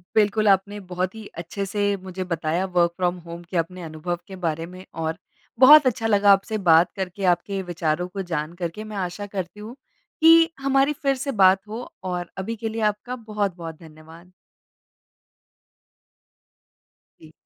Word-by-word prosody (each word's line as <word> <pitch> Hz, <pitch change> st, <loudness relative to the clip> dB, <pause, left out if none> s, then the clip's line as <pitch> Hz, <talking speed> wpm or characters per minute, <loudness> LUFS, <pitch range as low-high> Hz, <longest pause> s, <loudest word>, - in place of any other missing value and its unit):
बिल्कुल 215 Hz, 0 st, +3 dB
आपने 200 Hz, +1 st, +2 dB
बहुत 180 Hz, +1 st, -2 dB
ही 220 Hz, -1 st, -9 dB
अच्छे 175 Hz, +4 st, -4 dB
से 205 Hz, +1 st, 0 dB
मुझे 185 Hz, 0 st, -5 dB
बताया 170 Hz, 0 st, -1 dB
वर्क 175 Hz, -2 st, +2 dB
फ्रॉम 180 Hz, -1 st, 0 dB
होम 170 Hz, +1 st, -8 dB
के 180 Hz, -, -2 dB
अपने 180 Hz, +2 st, -2 dB
अनुभव 160 Hz, +2 st, -4 dB
के 195 Hz, -, -9 dB
बारे 165 Hz, 0 st, -1 dB
में 185 Hz, +2 st, -11 dB, 0.2 s
और 160 Hz, +1 st, -2 dB, 0.4 s
बहुत 290 Hz, +3 st, +9 dB
अच्छा 225 Hz, -2 st, 0 dB
लगा 205 Hz, -2 st, +5 dB
आपसे 200 Hz, +2 st, +2 dB
बात 170 Hz, -3 st, +4 dB
करके, 190 Hz, 0 st, -5 dB
आपके 190 Hz, +2 st, +1 dB
विचारों 175 Hz, -1 st, -2 dB
को 195 Hz, +2 st, -5 dB
जान 165 Hz, -3 st, -3 dB
करके 175 Hz, +3 st, -5 dB
मैं 215 Hz, -1 st, -7 dB
आशा 185 Hz, +2 st, -4 dB
करती 195 Hz, 0 st, -6 dB
हूँ 220 Hz, +4 st, -9 dB, 0.5 s
कि 330 Hz, +1 st, +7 dB
हमारी 275 Hz, +1 st, +2 dB
फिर 275 Hz, -2 st, 0 dB
से 275 Hz, +2 st, -3 dB
बात 195 Hz, -2 st, +4 dB
हो 225 Hz, +4 st, -6 dB, 0.2 s
और 180 Hz, -2 st, -3 dB
अभी 205 Hz, +4 st, -3 dB
के 225 Hz, 0 st, -4 dB
लिए 225 Hz, +1 st, -4 dB
आपका 210 Hz, +4 st, -1 dB
बहुत-बहुत 200 Hz, -8 st, -4 dB
धन्यवाद। 160 Hz, +2 st, -15 dB, 2.9 s
जी। 155 Hz, -, -15 dB
190 Hz, 160 wpm, -23 LUFS, 175-215 Hz, 2.9 s, बहुत